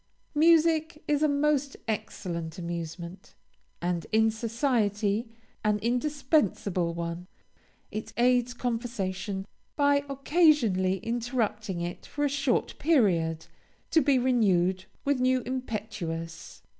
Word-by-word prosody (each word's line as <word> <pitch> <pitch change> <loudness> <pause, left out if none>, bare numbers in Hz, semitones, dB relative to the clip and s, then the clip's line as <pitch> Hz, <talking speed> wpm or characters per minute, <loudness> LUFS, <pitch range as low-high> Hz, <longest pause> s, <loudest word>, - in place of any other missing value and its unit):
Music 320 0 +3
is 295 -1 +2
a 305 - +4
most 285 -1 +1
excellent 170 -6 -4
amusement, 170 +1 -6 0.5
and, 175 -1 -1
in 220 0 +4
society, 225 -2 0 0.3
an 210 -1 +2
indispensable 240 - 0
one. 170 +1 -4 0.6
It 215 +1 -5
aids 245 0 +3
conversation 200 -6 -3 0.3
by 285 -1 +3
occasionally 275 - +3
interrupting 225 -5 -2
it 175 +1 -5
for 290 0 -1
a - - +2
short 275 -3 0
period, 180 - +2 0.5
to 320 - +5
be 275 -1 +3
renewed 190 -7 +2 0.2
with 285 -2 +2
a - - -1
new 255 0 +2
impetus. 205 -10 -5
225 Hz, 105 wpm, -28 LUFS, 185-275 Hz, 0.6 s, to